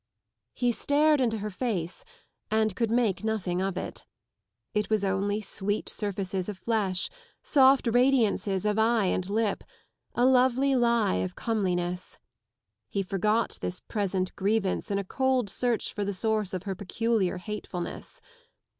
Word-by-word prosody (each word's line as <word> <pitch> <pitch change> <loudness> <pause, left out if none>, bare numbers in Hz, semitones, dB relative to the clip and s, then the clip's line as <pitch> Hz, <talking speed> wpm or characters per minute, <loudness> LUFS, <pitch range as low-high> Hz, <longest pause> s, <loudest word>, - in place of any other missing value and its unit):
He 245 -1 +2
stared 295 +4 +3
into 225 -3 +1
her 210 0 -4
face 185 -6 -3 0.5
and 220 -2 +1
could 230 0 0
make 225 -4 +1
nothing 195 -5 -1
of 195 -1 -2
it. - - -5 0.7
It 210 0 0
was 215 -2 +2
only 200 +2 0
sweet 205 0 -2
surfaces 195 -2 -2
of 205 - -5
flesh, 195 -2 0 0.4
soft 270 -1 +5
radiances 230 -5 +2
of 210 +1 +1
eye 225 -1 +3
and 185 0 -1
lip, 210 -1 0 0.5
a 245 - +3
lovely 260 +1 +4
lie 235 - +3
of 90 0 -3
comeliness. 180 -5 -2 0.7
He 200 - -1
forgot 210 +4 0
this 180 - -3
present 190 -3 -2
grievance 200 +1 0
in 200 - 0
a 200 - -1
cold 255 0 0
search 240 0 -1
for 205 - -2
the 200 0 -2
source 215 -1 0
of 185 -1 -4
her 195 -1 -3
peculiar 200 0 0
hatefulness. 180 -2 -6
210 Hz, 145 wpm, -28 LUFS, 190-230 Hz, 0.7 s, soft